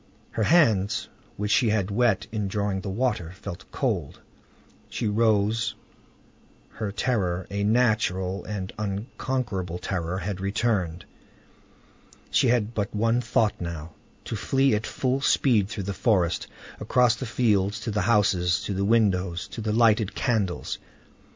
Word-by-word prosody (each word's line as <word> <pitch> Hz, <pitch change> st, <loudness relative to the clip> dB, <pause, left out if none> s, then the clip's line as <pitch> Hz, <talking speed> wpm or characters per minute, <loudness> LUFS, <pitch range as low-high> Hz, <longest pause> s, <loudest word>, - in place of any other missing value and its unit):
Her -, -, -3 dB
hands, 110 Hz, -, +3 dB, 0.3 s
which 105 Hz, +1 st, -2 dB
she 120 Hz, -, +4 dB
had 105 Hz, -2 st, 0 dB
wet 115 Hz, -1 st, +2 dB
in 105 Hz, -2 st, -2 dB
drawing 100 Hz, -1 st, -1 dB
the 100 Hz, -, -5 dB
water, 100 Hz, -5 st, -1 dB
felt 95 Hz, -1 st, -9 dB
cold; 100 Hz, -, -2 dB, 0.7 s
she 115 Hz, -, -2 dB
rose; 110 Hz, 0 st, +2 dB, 0.9 s
her 105 Hz, -2 st, -4 dB
terror, 95 Hz, -6 st, -1 dB
a 100 Hz, 0 st, -1 dB
natural 105 Hz, -4 st, +1 dB
and 100 Hz, -3 st, -5 dB
unconquerable 105 Hz, -3 st, -3 dB
terror, 90 Hz, -1 st, -3 dB
had 95 Hz, 0 st, -4 dB
returned: 100 Hz, -5 st, -1 dB, 1.3 s
she -, -, +3 dB
had 115 Hz, -2 st, +1 dB
but 105 Hz, -1 st, -2 dB
one 115 Hz, +3 st, +2 dB
thought 110 Hz, -5 st, +1 dB
now,—to 85 Hz, +5 st, -7 dB
flee 135 Hz, +4 st, +2 dB
at 105 Hz, +1 st, -1 dB
full 130 Hz, +1 st, -1 dB
speed 115 Hz, -7 st, +3 dB
through 105 Hz, -3 st, -4 dB
the 100 Hz, +2 st, -3 dB
forest, 95 Hz, -6 st, +1 dB, 0.3 s
across 125 Hz, -2 st, +3 dB
the 130 Hz, -, -5 dB
fields 105 Hz, -3 st, +1 dB
to 110 Hz, -, -3 dB
the 105 Hz, 0 st, 0 dB
houses, 95 Hz, -6 st, +2 dB
to 100 Hz, -, -3 dB
the 95 Hz, +1 st, -1 dB
windows, 95 Hz, -5 st, +1 dB
to 115 Hz, -, -6 dB
the 110 Hz, 0 st, -1 dB
lighted 110 Hz, -2 st, +3 dB
candles. 105 Hz, -8 st, -1 dB
105 Hz, 140 wpm, -26 LUFS, 95-115 Hz, 1.3 s, she